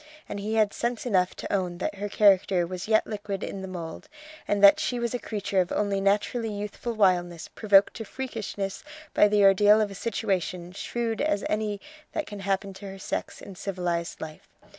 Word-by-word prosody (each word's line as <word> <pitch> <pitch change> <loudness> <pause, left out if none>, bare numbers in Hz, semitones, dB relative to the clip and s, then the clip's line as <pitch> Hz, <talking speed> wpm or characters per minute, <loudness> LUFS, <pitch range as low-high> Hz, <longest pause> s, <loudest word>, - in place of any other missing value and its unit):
And 205 - -5
he 215 +2 -2
had 215 -2 +3
sense 235 0 -2
enough 185 -6 +2
to - - -5
own 180 -3 -1
that 200 - -2
her 205 +1 -5
character 195 -3 +4
was 185 +2 -6
yet 220 0 +3
liquid 205 -2 -5
in 195 - -5
the 190 - -6
mould, 170 -3 -7 0.4
and 205 0 0
that 200 - +9
she 245 - -1
was 235 0 -1
a 245 - -1
creature 200 -4 -1
of 180 - -3
only 200 -1 0
naturally 210 +4 +1
youthful 210 +3 -4
wildness 175 -5 +1
provoked 200 -2 +4
to 225 - -5
freakishness 210 -5 -5 0.3
by 210 - +6
the 205 0 +3
ordeal 205 +2 +6
of 210 -2 0
a - - -6
situation 190 -4 -2
shrewd 225 +3 -3
as 290 -9 +1
any 210 -1 -1 0.3
that 310 - -2
can 205 -1 -8
happen 195 0 -1
to 190 +1 -9
her 195 - -8
sex 190 - -5
in 195 - -9
civilized 175 -3 -3
life. 155 -1 -8
200 Hz, 195 wpm, -27 LUFS, 190-215 Hz, 0.4 s, that